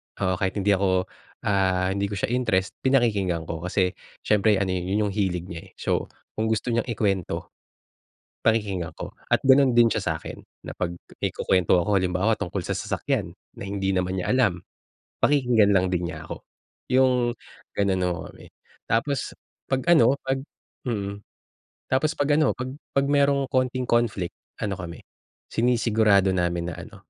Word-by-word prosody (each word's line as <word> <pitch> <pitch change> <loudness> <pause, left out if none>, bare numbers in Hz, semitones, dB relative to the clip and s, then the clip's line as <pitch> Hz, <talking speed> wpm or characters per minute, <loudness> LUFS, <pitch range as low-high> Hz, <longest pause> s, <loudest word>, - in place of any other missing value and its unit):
oo, 95 -2 0
kahit 95 -1 -1
hindi 105 0 +2
ako, 95 -1 +1 0.3
ah, 95 -2 +1
hindi 100 +1 -1
ko 100 - -5
siya 100 - -2
interest, 105 -6 +1
pinakikinggan 105 -10 +2
ko 80 0 -5
kasi 90 +1 0 0.3
siyempre 105 0 +3
ano, 95 -1 0
yun 95 +3 0
yung - - -2
hilig 95 -4 -1
niya, 85 - -8
eh. - - -28
So - - -1 0.3
kung 110 - +1
gusto 110 +2 0
niyang 115 +1 0
ikwento, 100 -6 -1 0.9
pakikinggan 100 -6 +1
ko - - -7 0.2
at - - +5
ganun 135 0 +6
din 120 0 +6
siya - - -1
sa - - -1
'kin - - -8 0.3
na - - -6
pag 90 -1 -1 0.3
may - - +1
kukwento 90 -1 +2
ako 105 +3 +1
halimbawa 95 +3 +2
tungkol 90 - -3
sa - - -3
sasakyan, - - -2 0.2
na - - -8
hindi 95 -1 -1
naman 90 0 -1
niya - - -3
alam, 105 -9 +2 0.6
pakikinggan 120 -8 +4
lang 95 -1 +2
din 90 -1 0
niya 80 -3 -7
ako, - - -7 0.5
yung 125 -2 +3 0.4
gano'n 95 -2 +1
ho 90 - -3
kami. - - -15 0.4
Tapos 135 +4 -1 0.3
pag 130 -1 0
ano 130 -5 +6
pag 135 0 0 0.5
mm, 100 -4 -2 0.7
tapos 140 +4 +1
pag 145 - 0
ano 155 -1 +3
pag 130 +1 -5 0.2
pag 140 0 +2
merong 140 -1 +3
kaunting 130 -1 0
conflict 115 -7 0 0.2
ano 100 -3 -2
kami, 85 -3 -7 0.5
sinisigurado 110 -5 +3
namin 85 -1 0
na - - -6
ano, - - -10
100 Hz, 165 wpm, -25 LUFS, 95-120 Hz, 0.9 s, ganun